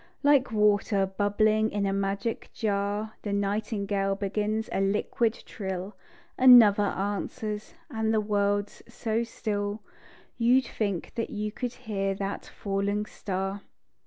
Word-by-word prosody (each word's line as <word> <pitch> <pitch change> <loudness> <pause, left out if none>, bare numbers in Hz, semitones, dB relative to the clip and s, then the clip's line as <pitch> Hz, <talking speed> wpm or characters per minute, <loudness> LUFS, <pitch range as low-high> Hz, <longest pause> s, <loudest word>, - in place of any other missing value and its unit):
Like 280 -3 +4
water 205 -2 +3
bubbling 215 +3 +2
in 205 -2 -1
a 195 - 0
magic 200 +3 -2
jar, 205 0 -1
The 205 - -4
nightingale 200 -1 -1
begins 210 +2 -1
a - - 0
liquid 210 +3 +1
trill, 190 0 -5 0.4
Another 230 -5 +8
answers; 210 +2 -3
and 220 -6 -1
the 220 - +3
world's 205 -1 0
so 230 -1 -1
still, 205 -2 -3 0.6
You'd 250 +3 +4
think 200 -7 -3
that 230 - -3
you 210 0 -3
could 245 +2 -4
hear 195 -4 -2
that 195 0 -4
falling 200 +1 -2
star. 195 -1 -4
205 Hz, 125 wpm, -28 LUFS, 200-220 Hz, 0.6 s, Another